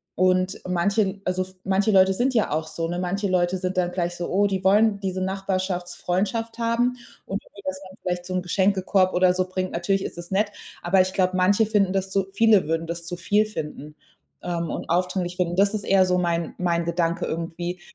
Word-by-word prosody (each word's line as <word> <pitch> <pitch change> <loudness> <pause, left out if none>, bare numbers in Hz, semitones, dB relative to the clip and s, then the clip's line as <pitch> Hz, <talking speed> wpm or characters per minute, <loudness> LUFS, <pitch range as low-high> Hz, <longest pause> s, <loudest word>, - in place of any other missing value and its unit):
und 185 +1 +1
manchen 195 +2 0
also, 185 0 0 0.2
manche 195 +3 +2
Leute 190 -1 +5
sind 255 +5 +1
ja 225 -3 +2
auch 155 +1 -1
so, 165 +1 -3
ne? 175 +1 -3
Manche 190 +3 -1
Leute 180 0 +1
sind 185 0 -3
dann 175 -1 +1
gleich 175 -1 -2
so, 175 0 -4
oh, 205 +2 +3
die 190 -2 -2
wollen 205 +2 +4
diese 190 -1 -3
Nachbarschaftsfreundschaft 190 +3 -2
haben 235 +2 +1 0.3
und 195 +1 -4
irgendwie, 200 - -15
dass 190 0 -3
man 190 - -15
vielleicht 180 -1 -3
so 185 - -5
'n 185 - 0
Geschenkekorb 190 +1 +2
oder 180 0 +4
so 185 0 0
bringt. 185 0 -3
Natürlich 195 +3 0
ist - - -6
das 175 +1 -8
nett, 205 +2 +1 0.3
aber 185 +2 +4
ich 185 0 -1
glaube, 185 -1 +1
manche 200 +4 +4
finden 200 -3 +2
das 195 0 -1
zu 195 0 +1
viele 210 -4 +4
würden 165 +1 -1
das 170 0 -5
zu 175 - -4
viel 205 +5 +2
finden, 150 -7 -7 0.5
ähm, 170 -2 -2
und - - -5
aufdringlich 180 +1 0
finden. 175 -1 0
Das 200 +2 +3
ist 210 -2 -2
eher 195 -1 +4
so 180 0 +1
mein 170 -1 -1
mein 170 -1 0
Gedanke 170 0 0
irgendwie. 170 +2 -4
185 Hz, 205 wpm, -24 LUFS, 175-195 Hz, 0.5 s, Leute